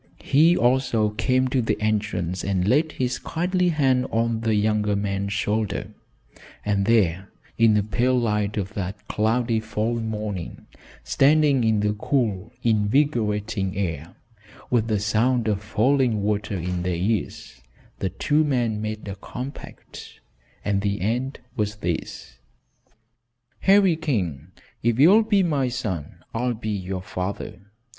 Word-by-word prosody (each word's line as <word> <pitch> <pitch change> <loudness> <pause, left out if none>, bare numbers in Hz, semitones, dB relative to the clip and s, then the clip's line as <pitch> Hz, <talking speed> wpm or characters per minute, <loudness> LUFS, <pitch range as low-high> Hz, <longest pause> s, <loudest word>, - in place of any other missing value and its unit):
He 160 +5 +4
also 120 -3 +2
came 130 +5 +1
to 130 0 +1
the 115 - -1
entrance 105 -5 -1
and 95 -2 0
laid 150 +7 +2
his 125 -1 -2
kindly 180 +2 0
hand 135 -5 +2
on 115 0 0
the 110 -1 +1
younger 105 0 +1
man's 100 0 -2
shoulder, 105 0 -1 0.7
and 100 -1 +1
there 100 -4 +2 0.3
in 115 -2 +4
the 105 - +2
pale 125 +4 +1
light 105 -2 -1
of 100 +1 -3
that 100 +1 -5
cloudy 115 +1 +1
fall 110 +2 -2
morning, 105 -5 -5 0.4
standing 145 -2 +3
in 110 -2 +2
the 105 0 +1
cool, 110 -2 -1
invigorating 105 -4 +1
air, 85 -4 -3 0.6
with 115 -3 +2
the 105 -3 +1
sound 110 +3 +1
of 105 -2 0
falling 110 +1 +1
water 105 -1 -1
in 90 +1 -3
their 90 0 -1
ears, 90 - -3 0.4
the 95 - -1
two 145 - +1
men 120 -7 0
made 110 0 -5
a 100 - -4
compact, 125 +7 -9 0.5
and 100 -1 +1
the 100 0 -1
end 125 +7 -1 0.2
was 105 0 -1
this. 85 -9 -5 1.2
"Harry 195 -3 +5
King, 105 - -2 0.3
if 120 0 +1
you'll 190 +10 +7
be 205 -3 +2
my 145 -6 +1
son, 95 - -5
I'll 125 +1 -1
be 110 0 -5
your 95 -2 -4
father. 90 0 -5
110 Hz, 135 wpm, -24 LUFS, 100-125 Hz, 1.2 s, you'll